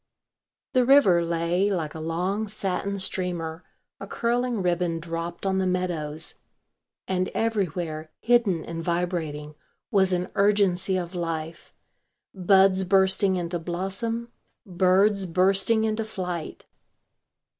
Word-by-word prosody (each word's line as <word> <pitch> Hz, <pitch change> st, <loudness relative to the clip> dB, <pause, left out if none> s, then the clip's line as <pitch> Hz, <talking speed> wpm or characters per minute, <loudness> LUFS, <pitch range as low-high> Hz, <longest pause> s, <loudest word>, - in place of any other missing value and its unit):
The 255 Hz, -, +4 dB
river 240 Hz, -10 st, +5 dB
lay 170 Hz, +3 st, 0 dB
like 165 Hz, -6 st, -2 dB
a 160 Hz, -, -7 dB
long 180 Hz, +7 st, -2 dB
satin 200 Hz, -1 st, -2 dB
streamer, 180 Hz, -3 st, -3 dB, 0.4 s
a -, -, -7 dB
curling 240 Hz, -2 st, -1 dB
ribbon 175 Hz, -2 st, 0 dB
dropped 165 Hz, +2 st, -5 dB
on 190 Hz, 0 st, +1 dB
the 190 Hz, -, +1 dB
meadows. 165 Hz, -4 st, -2 dB, 0.7 s
And 185 Hz, -1 st, 0 dB
everywhere, 175 Hz, -8 st, -2 dB
hidden 230 Hz, -9 st, +2 dB
and 165 Hz, 0 st, -5 dB
vibrating, 165 Hz, -4 st, -2 dB, 0.4 s
was 190 Hz, -2 st, +3 dB
an 180 Hz, 0 st, -1 dB
urgency 195 Hz, -2 st, +2 dB
of 175 Hz, 0 st, -4 dB
life: 165 Hz, -2 st, -5 dB, 0.6 s
buds 190 Hz, 0 st, +4 dB
bursting 190 Hz, 0 st, +3 dB
into 175 Hz, -1 st, -3 dB
blossom, 195 Hz, +7 st, -4 dB, 0.3 s
birds 190 Hz, +1 st, +2 dB
bursting 195 Hz, +5 st, +2 dB
into 220 Hz, 0 st, 0 dB
flight. 180 Hz, -6 st, -5 dB
185 Hz, 115 wpm, -25 LUFS, 170-200 Hz, 0.7 s, river